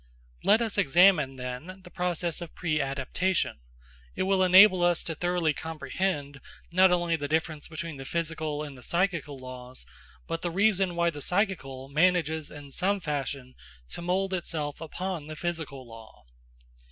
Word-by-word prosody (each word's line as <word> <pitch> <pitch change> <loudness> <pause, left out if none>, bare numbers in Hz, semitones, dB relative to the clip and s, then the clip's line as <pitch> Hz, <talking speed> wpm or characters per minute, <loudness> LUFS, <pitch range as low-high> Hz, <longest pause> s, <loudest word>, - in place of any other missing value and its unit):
Let 220 +3 +5
us 220 -3 -1
examine, 165 -4 +5
then, 130 +9 -7
the 180 - -13
process 175 -1 -2
of 170 - -8
preadaptation; 155 - -1 0.6
it - - 0
will 190 0 +2
enable 185 +1 +8
us 175 -1 +3
to 165 - -3
thoroughly 175 -1 0
comprehend, 155 -2 -3 0.3
not 185 +1 +6
only 175 -1 +2
the 145 -3 -3
difference 155 -1 -1
between 165 -1 -6
the 135 - -8
physical 155 -2 -2
and 145 -2 -8
the 125 - -13
psychical 170 -3 -1
laws, 130 0 -8 0.4
but 165 0 -3
the 175 - -1
reason 190 -1 +2
why 170 0 +2
the 145 -2 -8
psychical 160 -9 -1
manages 160 0 +2
in 145 -2 -10
some 195 +6 0
fashion 140 -5 -4 0.4
to - - -6
mould 190 +2 0
itself 155 -5 -3
upon 170 0 -4
the 155 - -6
physical 155 -6 -4
law. 115 - -13
165 Hz, 155 wpm, -28 LUFS, 145-180 Hz, 0.6 s, enable